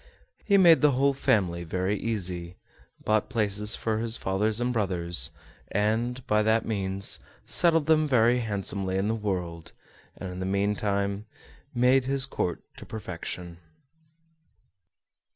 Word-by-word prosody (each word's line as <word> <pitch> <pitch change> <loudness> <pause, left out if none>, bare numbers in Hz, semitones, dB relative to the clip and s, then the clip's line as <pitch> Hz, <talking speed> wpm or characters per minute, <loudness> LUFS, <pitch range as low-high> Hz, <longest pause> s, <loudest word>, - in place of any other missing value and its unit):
He 200 -2 +4
made 170 -4 +6
the 150 -2 +4
whole 140 +2 +2
family 90 -9 +1
very 95 +4 -1
easy, 90 -5 -2 0.5
bought 110 0 +1
places 105 -3 -1
for 110 -1 -2
his 115 0 -1
father 95 +3 0
and 125 +1 0
brothers, 90 -6 +2 0.4
and, 115 +5 -1
by 105 -3 +2
that 110 +1 +2
means, 100 -2 -1 0.3
settled 165 -3 +2
them 155 -1 +3
very 120 -2 +3
handsomely 100 -3 -2
in 95 +2 0
the 110 - +1
world, 90 -6 -4 0.4
and, 95 - -6
in 90 - -7
the 95 - -3
meantime, 100 +1 -1 0.5
made 125 +2 +3
his 135 0 +2
court 90 -10 -3
to - - -10
perfection. 90 -4 -7
105 Hz, 135 wpm, -27 LUFS, 95-120 Hz, 0.5 s, made